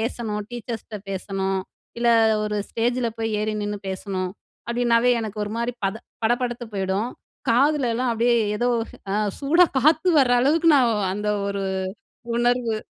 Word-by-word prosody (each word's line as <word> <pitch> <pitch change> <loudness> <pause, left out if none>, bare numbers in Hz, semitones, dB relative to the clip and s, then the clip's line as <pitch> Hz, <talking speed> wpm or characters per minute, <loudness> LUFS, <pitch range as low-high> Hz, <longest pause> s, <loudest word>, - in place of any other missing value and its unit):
பேசணும், 220 -2 -2
டீச்சர்ஸ்ட்ட 230 -2 -6
பேசணும், 195 0 -2 0.4
இல்ல 235 0 +2 0.4
ஒரு 210 0 -2
ஸ்டேஜில 240 +1 0
போய் 225 0 -1
ஏறி 215 0 -1
நின்னு 205 0 -3
பேசணும்" 190 -1 -3 0.4
அப்படின்னாவே 240 0 +3
எனக்கு 215 -1 -5
ஒரு 205 - -6
மாரி 235 +1 -1
பத 195 +2 0 0.3
படபடத்து 240 +1 0
போயிடும். 195 +4 -1 0.4
காதுலலாம் 255 -1 +2
அப்படியே 235 +1 +2 0.2
ஏதோ 240 +3 +1 0.4
அ. - - 0 0.3
சூடா 320 +6 +5
காத்து 310 +6 +3
வர 260 -3 +4
அளவுக்கு 315 +6 +3
நான் 245 -4 +4 0.2
அந்த 210 +2 -3 0.2
ஒரு, 200 -1 -2 0.7
உணர்வு. 240 -1 +1
235 Hz, 135 wpm, -23 LUFS, 210-245 Hz, 0.7 s, சூடா